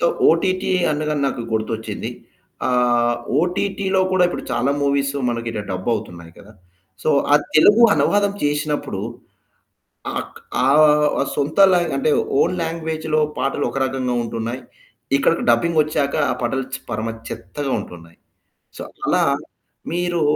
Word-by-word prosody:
So, 170 - +3 0.2
OTT 185 +4 +1 0.2
అనగానే 150 0 -1
నాకు 120 - -4
గుర్తొచ్చింది. 110 0 -3 0.6
ఆహ్, 120 -1 +2 0.2
ఓటిటిలో 190 +2 0
కూడా 180 -1 +4
ఇప్పుడు - - -5
చాలా 130 +3 +1
మూవీస్ 140 0 +1 0.2
మనకిట్టా 115 -2 -3
డబ్ 95 +4 -4
అవుతున్నాయి 85 -5 -8
కదా! 105 +2 -15 0.5
సో - - -1 0.2
ఆ - - +8 0.2
తెలుగు 205 +9 +6
అనువాదం 205 0 +2
చేసినప్పుడు 145 - -1 1.2
ఆక్ - - -6 0.3
ఆహ్, 150 0 +4
సొంత 145 +1 -2
లా 180 - +4 0.2
అంటే 135 +3 +1 0.3
ఓన్ - - +2
లాంగ్వేజ్‌లో 160 -1 -2 0.2
పాటలు 140 +1 -1
ఒక - - -6
రకంగా 130 -2 -2
ఉంటున్నాయి. 115 +2 -4 0.6
ఇక్కడికి 165 +4 +1
డబ్బింగ్ 155 +8 +3
వచ్చాక 150 -2 -1 0.2
ఆ - - 0
పాటలు 130 +3 -1
చె - - -7
పరమ 115 -1 -2 0.2
చెత్తగా 135 +9 -5
ఉంటున్నాయి. 85 -4 -11 0.6
సో - - -6 0.2
అలా - - +3 0.7
మీరు 175 -1 -1
140 Hz, 125 wpm, -20 LUFS, 120-160 Hz, 1.2 s, ఆ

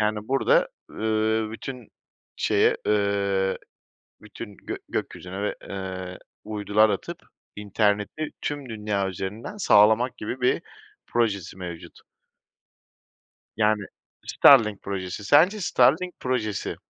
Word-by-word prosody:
Yani, 105 +1 -1
burada, 135 +1 +3 0.2
ııı, 110 0 0
bütün 125 0 -8 0.5
şeye, - - +2
ııı, 100 -2 +1 0.7
bütün 105 0 -10
gök - - -7
gökyüzüne 95 +2 -5
ve, 105 - -2
eee, 95 -1 -6 0.2
uydular 105 0 +2
atıp 100 - -3 0.4
interneti 105 +7 -1
tüm 145 -4 -4
dünya 105 -3 -2
üzerinden 105 - -6
sağlamak 110 - +4
gibi 125 +4 -5
bir 125 - +2 0.5
projesi 100 -6 -1
mevcut. 85 -3 -8 1.6
Yani, 105 -1 +2 0.4
Starlink 105 -3 +5
projesi, 95 0 -5
sence 165 - +5
Starlink 160 +5 +2
projesi, 110 -6 -2
105 Hz, 100 wpm, -25 LUFS, 100-115 Hz, 1.6 s, Starlink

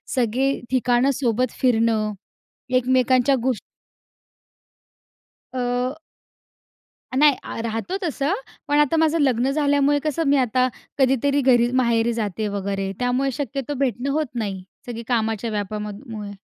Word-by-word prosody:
सगळे 255 +2 +1 0.2
ठिकाणं 255 +1 +3
सोबत 250 -2 0
फिरणं. 225 -3 +2 0.6
एकमेकांच्या 255 +1 +3
गोष् 255 -6 0 1.9
अ 250 +1 -1 1.2
नाही, 295 -2 +6
अ, - - -6
राहतो 230 - -3
तसं. 300 0 0 0.3
पण 290 - +2
आता 295 +2 +3
माझं 320 0 +3
लग्न 260 -2 +2
झाल्यामुळे 285 0 +2
कसं 310 +1 0
मी 280 0 +4
आता 255 0 +2 0.3
कधीतरी 270 +2 +3
घरी 245 -2 +4
माहेरी 235 -1 +2
जाते 215 -2 -2
वगैरे 195 0 -2
त्यामुळे 250 +2 +1
शक्यतो 275 0 -4
भेटणं 260 0 0
होत 305 0 0
नाही. 200 -5 -3 0.2
सगळी 235 -1 -6
कामाच्या 225 -2 0
व्यापामध 210 0 -4
अ, 270 - -16
मुळे. 205 -2 -6
250 Hz, 125 wpm, -22 LUFS, 225-275 Hz, 1.9 s, नाही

